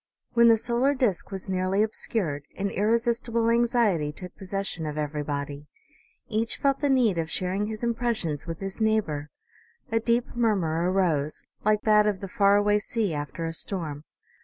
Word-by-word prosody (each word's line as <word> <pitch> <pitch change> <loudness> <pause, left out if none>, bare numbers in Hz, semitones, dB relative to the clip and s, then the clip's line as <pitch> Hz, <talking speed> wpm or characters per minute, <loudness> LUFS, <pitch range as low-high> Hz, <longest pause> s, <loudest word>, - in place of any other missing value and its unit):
"When 235 -1 +6
the 230 -1 +6
solar 245 +5 +1
disc 230 -9 0
was 195 -1 -6
nearly 190 +2 +1
obscured, 175 -9 -1
an 200 0 -1
irresistible 230 +2 +1
anxiety 230 - +2
took 180 +4 -10
possession 190 -4 -4
of 150 0 -5
everybody; 145 -1 -3 0.6
each 225 0 -1
felt 275 -1 +1
the 290 - +1
need 235 -10 +3
of 160 -1 -2
sharing 190 +4 -1
his 220 +1 -6
impressions 230 - -1
with 165 +1 -5
his 195 +3 -5
neigh 220 0 +4
bor. 150 -5 -6 0.6
A 225 - +3
deep 235 +2 0
murmur 180 -8 +1
arose, 160 -6 0 0.2
like 210 0 +2
that 210 -1 +5
of 205 -3 0
the 195 - -6
far 200 +1 +4
away 205 0 +3
sea 210 -3 -2
after 150 +3 -4
a 165 - -3
storm. 160 -5 -3
200 Hz, 165 wpm, -26 LUFS, 165-230 Hz, 0.6 s, When